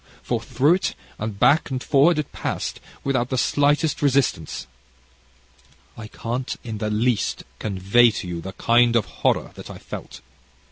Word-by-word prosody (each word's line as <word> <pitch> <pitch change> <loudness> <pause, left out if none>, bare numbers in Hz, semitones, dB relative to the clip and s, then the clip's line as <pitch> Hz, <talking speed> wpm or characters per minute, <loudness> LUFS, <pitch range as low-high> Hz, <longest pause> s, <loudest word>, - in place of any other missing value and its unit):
For - - -1
through 145 +6 +2
it, 185 - -1 0.2
and 105 -1 -4
back 155 +1 +4
and 130 -2 -3
forward 150 +4 +4
it 150 - -3
passed, - - -4 0.2
without 130 -3 0
the 130 - -1
slightest 145 +3 +2
resistance. 135 - 0 1.3
"I 110 - -8
can't, 120 +3 -4
in 110 -3 -5
the 105 - -1
least, 115 +2 0 0.2
convey 100 +4 +3
to 105 -3 -5
you 85 -1 -4
the 95 +2 -7
kind 120 +2 +3
of 115 - +3 0.2
horror - - +1
that - - -11
I - - -8
felt. 65 - -9
120 Hz, 155 wpm, -23 LUFS, 105-140 Hz, 1.3 s, back